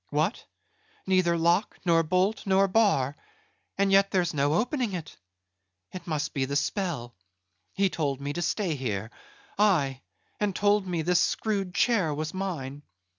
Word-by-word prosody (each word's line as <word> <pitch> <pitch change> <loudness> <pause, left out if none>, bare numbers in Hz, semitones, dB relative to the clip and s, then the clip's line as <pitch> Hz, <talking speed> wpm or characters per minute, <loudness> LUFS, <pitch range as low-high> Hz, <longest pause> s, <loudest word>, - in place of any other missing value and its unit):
What? 155 +9 0 0.6
neither 185 -3 +2
lock, 170 +5 +1
nor 165 -1 +4
bolt, 185 +6 0
nor 195 +1 +4
bar; 185 - +2 0.6
and 195 0 +2
yet 195 0 +5
there's 175 -2 0
no 145 +1 +1
opening 245 - 0
it. 165 -4 -6 0.8
It 185 - -8
must 150 -2 -2
be 135 -2 0
the 140 +2 -4
spell; 150 - -2 0.6
he 195 0 +3
told 145 -7 -2
me 140 +1 -4
to 175 - -3
stay 180 +1 0
here: 110 -6 -3 0.5
Aye, 145 -11 +2 0.4
and 205 -2 0
told 205 -1 +2
me 170 -3 -1
this 180 +2 +3
screwed 200 -3 -1
chair 190 -11 +2
was 155 +1 -4
mine. 155 -8 -4
175 Hz, 150 wpm, -27 LUFS, 145-195 Hz, 0.8 s, yet